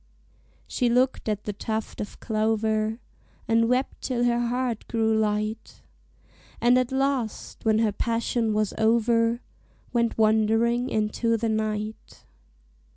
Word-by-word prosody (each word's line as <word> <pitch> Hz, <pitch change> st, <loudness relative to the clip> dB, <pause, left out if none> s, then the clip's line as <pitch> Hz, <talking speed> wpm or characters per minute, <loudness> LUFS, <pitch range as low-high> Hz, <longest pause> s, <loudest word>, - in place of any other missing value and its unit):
She 245 Hz, -2 st, 0 dB
looked 250 Hz, -1 st, +1 dB
at 210 Hz, -1 st, -2 dB
the 210 Hz, -, -4 dB
tuft 220 Hz, +2 st, -4 dB
of 205 Hz, -, -7 dB
clover, 220 Hz, 0 st, 0 dB, 0.5 s
And 230 Hz, +1 st, +3 dB
wept 255 Hz, +2 st, 0 dB
till 245 Hz, -2 st, -1 dB
her 240 Hz, 0 st, +2 dB
heart 245 Hz, -2 st, -2 dB
grew 225 Hz, -1 st, +1 dB
light; 215 Hz, 0 st, -2 dB, 0.8 s
And 240 Hz, +1 st, +4 dB
at 255 Hz, 0 st, -1 dB
last, 265 Hz, -4 st, -2 dB
when 220 Hz, -1 st, +4 dB
her 220 Hz, -1 st, +2 dB
passion 230 Hz, +1 st, -1 dB
was 210 Hz, -1 st, 0 dB
over, 230 Hz, +1 st, +2 dB, 0.5 s
Went 235 Hz, -1 st, +1 dB
wandering 225 Hz, +3 st, +2 dB
into 225 Hz, +1 st, 0 dB
the 225 Hz, 0 st, -1 dB
night. 215 Hz, 0 st, -3 dB
225 Hz, 125 wpm, -25 LUFS, 215-240 Hz, 0.8 s, And